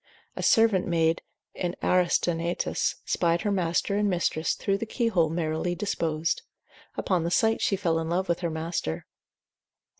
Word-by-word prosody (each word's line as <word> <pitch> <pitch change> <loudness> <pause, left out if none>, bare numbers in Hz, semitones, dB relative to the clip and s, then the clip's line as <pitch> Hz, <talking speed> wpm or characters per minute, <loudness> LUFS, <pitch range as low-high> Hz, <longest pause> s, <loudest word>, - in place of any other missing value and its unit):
A - - -4
servant 225 -6 +4
maid 165 -1 +2 0.3
in 175 -1 -3
Aristaenetus 175 -1 +1
spied 170 -1 +1
her 210 - 0
master 180 +1 0
and 205 0 +2
mistress 170 -3 0
through 195 0 -1
the 230 - -4
key 235 +1 0
hole 170 -7 +2
merrily 160 +1 -1
disposed; 165 -4 -1 0.6
upon 180 -4 0
the 170 - 0
sight 220 +5 +2
she 195 - +2
fell 170 -4 0
in 160 0 -3
love 185 +3 0
with 170 - 0
her 170 - -1
master. 160 - -3
175 Hz, 155 wpm, -27 LUFS, 165-195 Hz, 0.6 s, servant